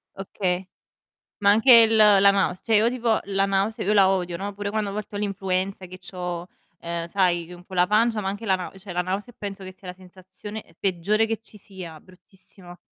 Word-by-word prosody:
Okay. 185 -1 -2 0.8
Ma 200 - +4
anche 225 +5 +5
il 225 -1 +7
la 205 -2 +6
naus 195 -2 0
cioè 225 - +2
io 220 +2 +4
tipo 240 -3 0
la 195 0 +1
nause 195 +3 -1
io 205 - +1
la 195 -2 +5
odio, 180 -3 -1
no. 200 +3 -5
Pure 205 0 -4
quando 210 -1 -2
a - - -6
volte 210 0 -6
ho - - -3
l'influenza 195 -1 -2
che 185 +1 -11
c'ho, 180 -1 -6 0.3
ehm, 170 0 -4
g - - -13
sai, 175 -2 0
un 175 - -13
po' 190 - -14
la 180 0 +3
pancia, 220 +1 +2
ma 190 - -2
anche 205 +3 -6
la 190 -3 +3
nau 185 +1 -7
cioè, 190 -1 -9
la 175 - 0
nausea 195 +6 -4
e - - -45
penso 200 -1 -7
che 185 - -8
sia 185 0 -15
la 180 - -6
sensazione 185 +3 -11
e 165 - -24
peggiore 200 +4 +1
che 225 0 -3
ci 225 - -16
sia, 185 -5 -10
bruttissimo. 185 0 -17
195 Hz, 230 wpm, -24 LUFS, 180-210 Hz, 0.8 s, il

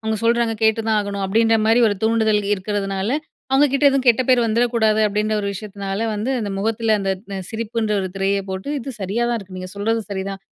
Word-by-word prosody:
அவுங்க 220 0 -1
சொல்றாங்க 235 -1 +2
கேட்டு 220 0 +3
தான் 215 -1 +3
ஆகணும்" 200 -1 -2
அப்டின்ற 225 +3 +3
மாரி 225 +2 +4
ஒரு 205 - 0
தூண்டுதல் 220 -2 +2
இருக்கிறதுனால 200 +4 -2 0.3
அவுங்க 270 +2 +5
கிட்ட 275 +1 +1
எதுவும் 270 -2 0
கெட்ட 240 +1 +5
பேர் 250 -2 +4
வந்துரக்கூடாது, 225 -1 +2
அப்படின்ற 210 +1 -1
ஒரு 200 - -2
விஷயத்துனால 195 -1 -5 0.2
வந்து, 215 +5 -2
அந்த 205 -2 -3
முகத்தில 225 +1 +1
அந்த 195 -1 -1 0.2
ந 195 - -3
சிரிப்புன்ற 225 -1 -2
ஒரு 185 - -3
திரைய 195 +1 +1
போட்டு 190 +6 -5
"இது 270 +1 -6
சரியா 205 +6 -1
தான் 235 - 0
இருக்கு. 190 -3 -10
நீங்க 185 0 -7
சொல்றதும் 220 0 -1
சரிதான்" 195 0 -4
215 Hz, 200 wpm, -21 LUFS, 200-230 Hz, 0.3 s, அவுங்க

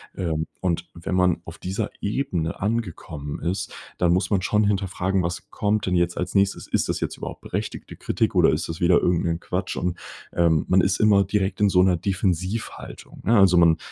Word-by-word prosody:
Ähm, 80 -3 -2
und 85 -1 -2
wenn 85 +2 -5
man 90 -2 +2
auf 80 - -10
dieser 100 +4 -3
Ebene 100 - -2
angekommen 90 -9 -3
ist, 90 +4 -2 0.3
dann 85 -1 +3
muss 95 +3 +1
man 100 -3 +2
schon 105 +3 +2
hinterfragen: 95 -2 0
„Was 85 0 -4
kommt 105 +1 0
denn 90 - 0
jetzt 85 0 +1
als 90 +1 -3
Nächstes? 100 -1 +1
Ist - - 0
das - - -1
jetzt - - -3
überhaupt - - -7
berechtigte - - -5
Kritik - - -1
oder - - +5
ist - - -1
das 80 0 -6
wieder 85 0 +4
irgend 90 -1 +1
'nen 85 -1 -1
Quatsch?“ - - -3
Und, 90 -1 -2 0.3
ähm, 80 -3 +2
man 95 +1 +4
ist 95 0 +1
immer 105 -2 +5
direkt 95 0 -1
in 105 - +5
so 90 -1 +4
'ner 90 -2 +3
Defensivhaltung, 95 +3 -3
ne? 115 +3 +3
Also, 95 -3 +6
man 85 -2 +5
90 Hz, 200 wpm, -24 LUFS, 85-100 Hz, 0.3 s, Also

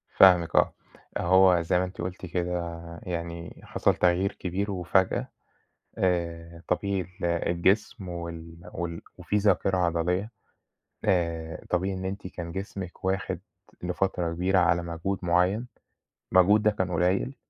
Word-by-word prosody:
فاهمِك 90 -4 +6
آه. - - +4 0.4
أهو 95 -1 +5
زي 85 +2 +2
ما 90 - +1
أنتِ 90 -1 -8
قُلتِ 90 +1 -5
كده 85 -1 -2 0.3
يعني 85 -1 -5
حصل - - +1
تغيير 90 +2 +2
كبير 95 +3 -2
وفجأة، 95 0 +1 0.7
آآ 85 -2 -1
طبيعي 100 +1 0
ال 90 +1 -8
الجسم 85 +3 +1
وال 85 -1 -7
وال 85 -1 -4 0.2
وفي 105 - -1
ذاكرة 100 -2 +2
عضلية، 90 +4 0 0.8
آآ 85 -3 0
طبيعي 95 +2 0
إن 95 - -5
أنتِ 95 0 -4
كان 85 -2 -7
جسمِك 95 0 -6
واخِد 95 0 -1 0.4
لفترة 90 -2 -1
كبيرة 90 +2 +2
على 85 0 +3
مجهود 85 +3 -3
معيّن، 90 +7 +2 0.6
المجهود 100 +4 +5
ده 105 - +5
كان 95 -3 -2
قليّل، 90 +9 +1
90 Hz, 130 wpm, -27 LUFS, 85-95 Hz, 0.8 s, فاهمِك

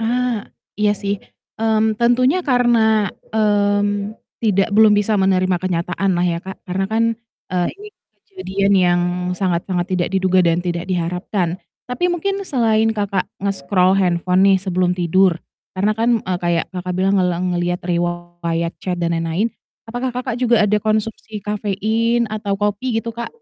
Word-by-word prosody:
Ah. 240 -1 -1 0.3
Iya 210 0 +4
sih, 200 0 0 0.5
mmm, 220 -1 +1
tentunya 255 +7 +3
karena, 230 -4 +3 0.2
mmm, 205 -1 +1 0.2
tidak 205 -3 +1
belum 215 0 +6
bisa 205 0 +1
menerima 185 -1 +2
kenyataan 180 +1 -1
lah 175 - +1
ya 170 -1 0
Kak. 190 +1 -8
Karena 190 0 -2
kan, 220 +2 +1 0.5
eee, 180 -1 +1
ini 420 +1 -11 0.4
kejadian 200 - -1
yang 180 -2 +4 0.4
sangat 180 -2 -1
sangat 180 0 -1
tidak 180 -1 0
diduga 185 -1 +2
dan 170 0 +1
tidak 175 0 -3
diharapkan. 180 0 -2 0.2
Tapi 250 +9 -1
mungkin 390 +3 -1
selain 225 - +1
Kakak 200 -2 -1 0.2
nge-scroll 190 -1 +2
handphone 180 +1 +2
nih 195 - +5
sebelum 185 -1 0
tidur, 180 0 +3 0.4
karena 205 +3 +2
kan, 230 +1 +1
eee, 185 -1 -1
kayak 170 -1 +1
Kakak 180 0 -4
bilang 190 +1 +2
ngeleng 180 0 0
ngelihat 175 0 -2
riwayat 175 -1 -2
chat, 180 0 -2
dan 170 -1 -1
lain-lain. 165 +7 -1 0.3
Apakah 245 +3 -3
Kakak 250 -1 -4
juga 235 -3 +4
ada 210 +1 +2
konsumsi 215 +1 -2
kafein 220 +3 0
atau 205 -2 -2
kopi 210 +4 -1
gitu 230 +1 -3
Kak? 235 +1 -5
195 Hz, 150 wpm, -19 LUFS, 180-220 Hz, 0.5 s, belum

